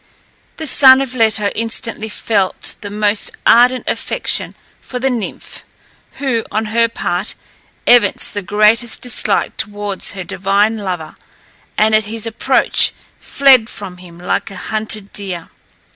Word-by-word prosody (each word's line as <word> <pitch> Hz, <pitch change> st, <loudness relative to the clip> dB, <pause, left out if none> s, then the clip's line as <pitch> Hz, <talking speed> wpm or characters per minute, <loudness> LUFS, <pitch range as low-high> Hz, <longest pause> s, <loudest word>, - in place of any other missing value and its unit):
The 320 Hz, -, -5 dB
son 265 Hz, -1 st, +6 dB
of 270 Hz, -2 st, -3 dB
Leto 220 Hz, -4 st, +2 dB
instantly 225 Hz, -1 st, -3 dB
felt 200 Hz, -3 st, -1 dB
the 205 Hz, -, -6 dB
most 210 Hz, 0 st, 0 dB
ardent 250 Hz, +2 st, +4 dB
affection -, -, -2 dB, 0.3 s
for 250 Hz, -, -6 dB
the 265 Hz, +2 st, 0 dB
nymph, 235 Hz, -4 st, -6 dB, 0.5 s
who, 260 Hz, -5 st, -2 dB
on 220 Hz, +1 st, -1 dB
her 230 Hz, 0 st, +4 dB
part, 185 Hz, -3 st, -3 dB, 0.5 s
evinced 240 Hz, -4 st, +3 dB
the 205 Hz, -, -3 dB
greatest 215 Hz, +4 st, +2 dB
dislike 245 Hz, -, 0 dB
towards 205 Hz, -2 st, -2 dB
her 190 Hz, -2 st, -6 dB
divine 200 Hz, +5 st, 0 dB
lover, 180 Hz, -6 st, -5 dB, 0.6 s
and, 215 Hz, +1 st, +3 dB
at 215 Hz, -1 st, +3 dB
his 225 Hz, +1 st, -3 dB
approach, 225 Hz, -1 st, +2 dB, 0.3 s
fled 260 Hz, -5 st, +4 dB
from 190 Hz, -3 st, -7 dB
him 175 Hz, -2 st, -14 dB
like 180 Hz, -, -2 dB
a 195 Hz, -, -10 dB
hunted 215 Hz, +1 st, -4 dB
deer. 185 Hz, -5 st, -6 dB
215 Hz, 135 wpm, -16 LUFS, 200-235 Hz, 0.6 s, son